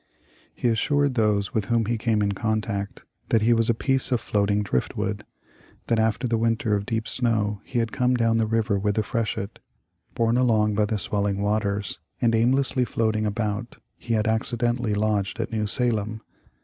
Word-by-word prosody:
He -, -, -1 dB
assured 140 Hz, +5 st, +1 dB
those 105 Hz, -4 st, +1 dB
with 110 Hz, -2 st, 0 dB
whom 115 Hz, +1 st, +1 dB
he 120 Hz, +3 st, 0 dB
came 110 Hz, -2 st, 0 dB
in 100 Hz, -, +1 dB
contact 105 Hz, -1 st, -3 dB, 0.3 s
that 110 Hz, -2 st, +3 dB
he 120 Hz, +2 st, +4 dB
was 115 Hz, 0 st, +2 dB
a 115 Hz, -, +3 dB
piece 135 Hz, +2 st, +1 dB
of 125 Hz, -, +2 dB
floating 105 Hz, -1 st, 0 dB
driftwood; 65 Hz, -11 st, -2 dB, 0.6 s
that 115 Hz, -, +1 dB
after 110 Hz, +3 st, +1 dB
the 115 Hz, -1 st, 0 dB
winter 115 Hz, -1 st, +1 dB
of 100 Hz, +1 st, -3 dB
deep 110 Hz, -2 st, -2 dB
snow, 105 Hz, -4 st, +1 dB
he 125 Hz, -, -5 dB
had 115 Hz, -1 st, 0 dB
come 125 Hz, -1 st, +1 dB
down 115 Hz, -1 st, +2 dB
the 110 Hz, -, +1 dB
river 110 Hz, -2 st, +1 dB
with 105 Hz, +1 st, 0 dB
the 110 Hz, -, +1 dB
freshet; 105 Hz, -3 st, -3 dB, 0.6 s
borne 115 Hz, +1 st, +2 dB
along 110 Hz, -4 st, +3 dB
by 105 Hz, +1 st, +2 dB
the 105 Hz, +1 st, -1 dB
swelling 100 Hz, -2 st, 0 dB
waters, 100 Hz, -3 st, -1 dB, 0.2 s
and 115 Hz, -2 st, +2 dB
aimlessly 125 Hz, +3 st, +2 dB
floating 110 Hz, -2 st, 0 dB
about, 105 Hz, +2 st, -3 dB, 0.2 s
he 115 Hz, -, -3 dB
had 110 Hz, -, +1 dB
accidentally 120 Hz, -1 st, 0 dB
lodged 105 Hz, -3 st, -1 dB
at -, -, -3 dB
New 110 Hz, -2 st, -1 dB
Salem. 110 Hz, -2 st, 0 dB
110 Hz, 180 wpm, -24 LUFS, 105-115 Hz, 0.6 s, he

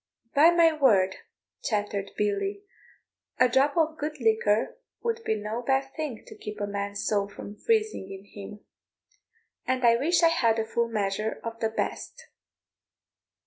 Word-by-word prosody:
"By 300 Hz, +4 st, +7 dB
my 335 Hz, -1 st, +5 dB
word," 210 Hz, -11 st, +3 dB, 0.5 s
chattered 205 Hz, -3 st, -1 dB
Billy, 300 Hz, -, -1 dB, 0.8 s
"a 255 Hz, -, +6 dB
drop 270 Hz, +5 st, +2 dB
of 320 Hz, -1 st, +1 dB
good 300 Hz, 0 st, -4 dB
liquor 220 Hz, -, +1 dB, 0.2 s
would 460 Hz, -1 st, -1 dB
be 220 Hz, -, 0 dB
no 215 Hz, +3 st, -4 dB
bad 270 Hz, +2 st, 0 dB
thing 300 Hz, -8 st, -4 dB
to -, -, -12 dB
keep 210 Hz, 0 st, -8 dB
a 205 Hz, -, -1 dB
man's 200 Hz, 0 st, -4 dB
soul 200 Hz, -2 st, +1 dB
from 205 Hz, 0 st, -9 dB
freezing 430 Hz, -, 0 dB
in 195 Hz, 0 st, -9 dB
him; 205 Hz, +1 st, -10 dB, 1.1 s
and 255 Hz, -1 st, +1 dB
I 235 Hz, 0 st, +6 dB
wish 340 Hz, +7 st, +2 dB
I 335 Hz, -, +7 dB
had 235 Hz, -9 st, +2 dB
a 225 Hz, -, 0 dB
full 235 Hz, +1 st, 0 dB
measure 215 Hz, -1 st, -2 dB
of 230 Hz, 0 st, -6 dB
the 225 Hz, -, 0 dB
best." 480 Hz, -, -4 dB
230 Hz, 155 wpm, -27 LUFS, 205-305 Hz, 1.1 s, By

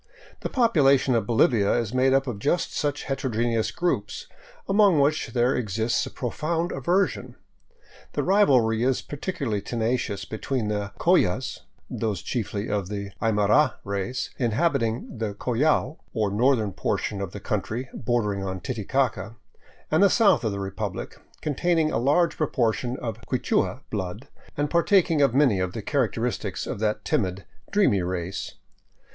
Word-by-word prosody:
The -, -, -4 dB
population 140 Hz, -, +3 dB
of 110 Hz, -3 st, 0 dB
Bolivia 110 Hz, -3 st, +3 dB
is 120 Hz, -2 st, -1 dB
made 130 Hz, +1 st, +3 dB
up 135 Hz, 0 st, +3 dB
of 120 Hz, -6 st, -4 dB
just 150 Hz, +10 st, 0 dB
such 145 Hz, -1 st, -1 dB
heterogeneous 120 Hz, -4 st, -1 dB
groups, 175 Hz, +1 st, -2 dB, 0.4 s
among 195 Hz, -5 st, +4 dB
which 145 Hz, +3 st, +2 dB
there 120 Hz, +2 st, +1 dB
exists 110 Hz, 0 st, 0 dB
a -, -, -6 dB
profound 165 Hz, +7 st, -2 dB
aver 175 Hz, +9 st, +2 dB
sion. -, -, -9 dB, 0.8 s
The -, -, -1 dB
rivalry 130 Hz, -, +3 dB
is 130 Hz, +1 st, +1 dB
particularly 140 Hz, -, -3 dB
tenacious 115 Hz, -4 st, -2 dB
between 110 Hz, +1 st, -3 dB
the 105 Hz, -1 st, -2 dB
Collas, -, -, +2 dB, 0.3 s
those, 105 Hz, -6 st, -3 dB
chiefly 105 Hz, -3 st, -3 dB
of 100 Hz, -3 st, -2 dB
the 100 Hz, -1 st, -5 dB
Aymara 110 Hz, +5 st, +3 dB
race, 100 Hz, +5 st, -3 dB
inhabiting 120 Hz, -2 st, 0 dB
the 105 Hz, -3 st, -2 dB
Collao, 145 Hz, +7 st, +1 dB, 0.2 s
or 105 Hz, -3 st, +1 dB
northern 110 Hz, -2 st, +2 dB
portion 100 Hz, +2 st, -2 dB
of 95 Hz, -3 st, -4 dB
the 105 Hz, -, -7 dB
country 110 Hz, +5 st, -3 dB
bordering 105 Hz, -4 st, -1 dB
on 95 Hz, -1 st, -4 dB
Titicaca, 110 Hz, 0 st, -2 dB, 0.6 s
and 155 Hz, +3 st, +3 dB
the 200 Hz, -, +7 dB
south 205 Hz, -, +4 dB
of 110 Hz, -, 0 dB
the 100 Hz, -, -4 dB
republic, 95 Hz, 0 st, -5 dB, 0.2 s
containing 160 Hz, +1 st, +1 dB
a -, -, 0 dB
large 150 Hz, +7 st, +2 dB
proportion 125 Hz, -5 st, 0 dB
of 115 Hz, -2 st, -5 dB
Quichua 130 Hz, 0 st, 0 dB
blood 100 Hz, +3 st, -4 dB, 0.3 s
and 145 Hz, 0 st, -1 dB
partaking 170 Hz, -2 st, +3 dB
of 135 Hz, -3 st, +3 dB
many 130 Hz, -9 st, +4 dB
of 90 Hz, 0 st, -2 dB
the -, -, -5 dB
characteristics -, -, -1 dB
of -, -, -5 dB
that 105 Hz, 0 st, -1 dB
timid, 100 Hz, -, -1 dB, 0.3 s
dreamy 195 Hz, -, +3 dB
race. 90 Hz, +1 st, -4 dB
120 Hz, 145 wpm, -25 LUFS, 105-145 Hz, 0.8 s, the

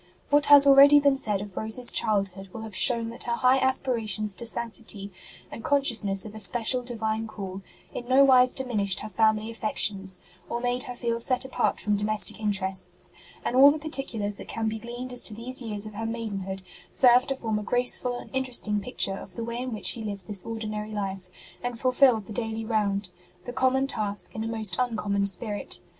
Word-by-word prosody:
What 290 Hz, 0 st, +3 dB
has 285 Hz, -1 st, +9 dB
already 280 Hz, +1 st, +8 dB
been 280 Hz, -1 st, +3 dB
said 210 Hz, -7 st, -2 dB
of 200 Hz, -2 st, -9 dB
Rose 220 Hz, +1 st, +3 dB
s 250 Hz, -1 st, +2 dB
childhood 195 Hz, -3 st, -1 dB
will 225 Hz, -, -8 dB
have 220 Hz, -3 st, -9 dB
shown 230 Hz, 0 st, +3 dB
that 235 Hz, -, -6 dB
her 235 Hz, -, -1 dB
high 255 Hz, +2 st, +3 dB
aspira 255 Hz, -4 st, +1 dB
tions 210 Hz, 0 st, 0 dB
to 235 Hz, +5 st, -2 dB
sanctity, 225 Hz, -3 st, -6 dB, 0.4 s
and 225 Hz, -, -9 dB
consciousness 225 Hz, -9 st, +2 dB
of 215 Hz, -, -9 dB
a 220 Hz, -, -8 dB
special 240 Hz, +4 st, +2 dB
Divine 225 Hz, -2 st, -3 dB
call, 195 Hz, -3 st, -7 dB, 0.3 s
in 240 Hz, -, -7 dB
nowise 255 Hz, -1 st, +5 dB
diminished 210 Hz, -8 st, -1 dB
her 215 Hz, -, -7 dB
family 220 Hz, 0 st, +1 dB
affec 225 Hz, -1 st, -4 dB
tions, 195 Hz, -2 st, 0 dB, 0.3 s
or 235 Hz, -, -3 dB
made 245 Hz, +1 st, -1 dB
her 250 Hz, -, -7 dB
feel 235 Hz, -1 st, -2 dB
set 255 Hz, +2 st, +2 dB
apart 250 Hz, -2 st, -1 dB
from 210 Hz, -1 st, 0 dB
domestic 210 Hz, +1 st, 0 dB
interests; 195 Hz, -3 st, -1 dB, 0.3 s
and 245 Hz, -, -1 dB
all 275 Hz, +2 st, +8 dB
the 295 Hz, -, 0 dB
particulars 270 Hz, -10 st, -3 dB
that -, -, -10 dB
can 225 Hz, -1 st, -3 dB
be 220 Hz, 0 st, -3 dB
gleaned 240 Hz, +2 st, -7 dB
as 245 Hz, -, -4 dB
to 215 Hz, -, -3 dB
these 255 Hz, +4 st, 0 dB
years 215 Hz, -3 st, -3 dB
of 215 Hz, -, -9 dB
her 225 Hz, +2 st, -4 dB
maidenhood 200 Hz, -4 st, -5 dB, 0.3 s
serve 250 Hz, -1 st, +4 dB
to 270 Hz, -, -2 dB
form 220 Hz, -4 st, -3 dB
a -, -, -6 dB
graceful 245 Hz, +2 st, 0 dB
and -, -, -11 dB
interesting 250 Hz, -5 st, +1 dB
picture 195 Hz, -4 st, 0 dB
of -, -, -11 dB
the 230 Hz, -, -5 dB
way 235 Hz, +1 st, -5 dB
in 255 Hz, 0 st, -4 dB
which 215 Hz, -, -7 dB
she 230 Hz, -, 0 dB
lived 200 Hz, -3 st, -6 dB
this 200 Hz, -1 st, 0 dB
ordinary 215 Hz, -1 st, -5 dB
life, 195 Hz, -3 st, -5 dB, 0.3 s
and 245 Hz, -1 st, -5 dB
fulfilled 255 Hz, -4 st, +3 dB
the 215 Hz, -, -9 dB
daily 225 Hz, 0 st, -3 dB
round, 200 Hz, -4 st, -1 dB, 0.3 s
the 245 Hz, -, -6 dB
common 260 Hz, +1 st, +1 dB
task 210 Hz, -6 st, -1 dB
in 220 Hz, -, -4 dB
a -, -, -4 dB
most 220 Hz, -3 st, +4 dB
uncommon 210 Hz, -5 st, 0 dB
spirit. 205 Hz, +1 st, -2 dB
225 Hz, 205 wpm, -26 LUFS, 210-250 Hz, 0.4 s, has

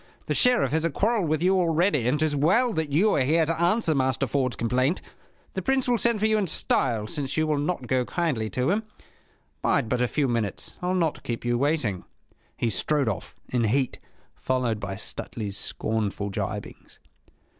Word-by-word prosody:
The -, -, -1 dB
Sheriff 245 Hz, -, +3 dB
has 160 Hz, +1 st, +1 dB
a 165 Hz, -, +2 dB
quarrel 210 Hz, +3 st, +1 dB
with 155 Hz, +1 st, 0 dB
you 190 Hz, +1 st, +4 dB
already, 165 Hz, -, +2 dB
and 140 Hz, +4 st, +1 dB
'tis 155 Hz, -2 st, +1 dB
well 220 Hz, -, +3 dB
that 160 Hz, -4 st, -2 dB
you 190 Hz, +9 st, +3 dB
are -, -, +2 dB
here 160 Hz, +5 st, +3 dB
to 165 Hz, +1 st, -2 dB
answer 175 Hz, -1 st, +2 dB
Master 130 Hz, -1 st, +1 dB
Ford's 130 Hz, -3 st, 0 dB
complaint. 130 Hz, +8 st, +1 dB, 0.5 s
The 190 Hz, -, -2 dB
Prince 265 Hz, +6 st, +1 dB
will 240 Hz, -2 st, +2 dB
send 235 Hz, 0 st, +2 dB
for 215 Hz, -, +1 dB
you 220 Hz, 0 st, +3 dB
in 195 Hz, -, 0 dB
style, 115 Hz, -8 st, +1 dB
since 140 Hz, +4 st, -3 dB
you 155 Hz, -, +3 dB
will 150 Hz, -2 st, 0 dB
not 145 Hz, -2 st, -2 dB
go 130 Hz, +1 st, +1 dB
kindly 130 Hz, -8 st, -1 dB
to 130 Hz, +8 st, 0 dB
him. 210 Hz, +3 st, +1 dB, 0.8 s
Bide -, -, +1 dB
but 125 Hz, +1 st, 0 dB
a 125 Hz, -, +3 dB
few 145 Hz, +2 st, 0 dB
minutes. 115 Hz, -5 st, -2 dB
I'll 180 Hz, +1 st, 0 dB
not 165 Hz, -4 st, 0 dB
keep 120 Hz, 0 st, -5 dB
you 120 Hz, 0 st, +1 dB
waiting!" 125 Hz, -, 0 dB, 0.5 s
He 115 Hz, -, 0 dB
strode 140 Hz, +6 st, +1 dB
off, 105 Hz, -, -5 dB
in 120 Hz, -2 st, +1 dB
heat, 130 Hz, +4 st, 0 dB, 0.3 s
followed 125 Hz, -4 st, -1 dB
by 100 Hz, -1 st, -4 dB
Stuteley's 105 Hz, 0 st, -5 dB
scornful 105 Hz, -2 st, -2 dB
gibings. -, -, -6 dB
145 Hz, 190 wpm, -26 LUFS, 120-175 Hz, 0.8 s, you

